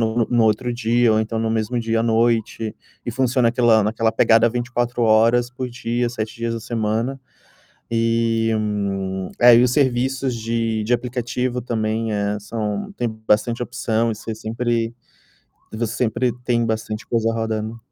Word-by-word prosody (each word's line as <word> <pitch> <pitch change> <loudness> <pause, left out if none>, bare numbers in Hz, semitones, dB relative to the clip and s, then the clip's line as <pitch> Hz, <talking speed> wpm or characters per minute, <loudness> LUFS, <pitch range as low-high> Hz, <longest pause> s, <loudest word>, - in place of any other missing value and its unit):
no 115 0 +1
no 120 -2 +3
outro 110 +3 +1
dia 120 -1 +2
ou 110 - +2
então 110 +1 -2
no 110 0 0
mesmo 110 +2 -1
dia 115 0 0
à - - +1
noite, 115 -1 +1 0.3
e - - -3
funciona 125 0 +2
aquela 115 -2 +4
naquela 110 +1 0
pegada 115 +1 +4
24 120 0 -2
horas 115 +2 +4
por 125 0 -4
dia, 120 0 -2
7 110 -2 -5
dias 115 0 -2
da 115 - -4
semana. 115 +3 -2 0.8
E, 115 0 +1 0.9
é 120 0 +8
e 120 - +6
os 125 - +2
serviços 130 -1 +1
de 115 -1 -1
de 120 +3 +1
aplicativo 125 +1 -2
também 110 -1 -2
é 105 0 -1
são 105 -1 -4
tem 120 - 0 0.2
bastante 115 +3 +2
opção 115 -1 -1
e 110 - -4
você 110 +1 -6
sempre 115 +1 -2 0.8
você 110 0 -3
sempre 120 +1 0
tem 120 -1 +1
bastante 110 -1 -3
coisa 115 -1 0
rodando. 110 0 -3
115 Hz, 155 wpm, -21 LUFS, 110-120 Hz, 0.9 s, é